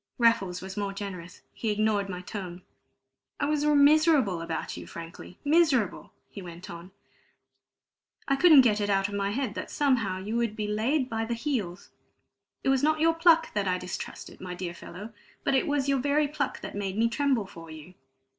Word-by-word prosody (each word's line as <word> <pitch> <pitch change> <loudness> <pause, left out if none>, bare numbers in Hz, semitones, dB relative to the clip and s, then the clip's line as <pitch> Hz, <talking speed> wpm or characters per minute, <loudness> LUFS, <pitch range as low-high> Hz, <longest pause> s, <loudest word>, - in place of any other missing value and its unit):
Raffles 195 -7 +2
was 190 0 -7
more 200 -1 -2
generous; 185 -3 -7
he 225 - -3
ignored 210 -1 +1
my 180 -1 -5
tone. 180 -2 -7 0.8
"I 285 - +1
was 295 0 0
miserable 295 - +4
about 165 -1 -4
you - - -9
frankly 170 +2 -10
miserable!" 290 - +2 0.2
he 200 - -10
went 175 0 -9
on. 170 +1 -9 1.4
"I 275 - +3
couldn't 305 -1 +8
get 215 -4 +2
it 205 - -1
out 195 0 +2
of - - -8
my 200 0 -1
head 240 0 -2
that - - -6
somehow 240 -10 +1
you 205 +4 -4
would 230 -3 -1
be 215 - -3
laid 245 +7 0
by 225 -2 -2
the 235 +1 -2
heels. 230 - -3 0.7
It - - +1
was 270 -1 +3
not 310 +1 +2
your 330 +1 +4
pluck 330 0 +4
that 205 -2 -1
I 180 0 +1
distrusted, 180 0 -7
my 180 -1 -6
dear 180 -1 -5
fellow, 205 +6 -10 0.3
but - - +1
it 265 - +2
was 290 -2 0
your 275 -1 +2
very 290 +3 +2
pluck 285 -1 -3
that - - -7
made 200 -1 -3
me 230 +1 +3
tremble 255 -2 0
for 165 -3 -12
you. 155 +3 -11
215 Hz, 190 wpm, -28 LUFS, 185-280 Hz, 1.4 s, couldn't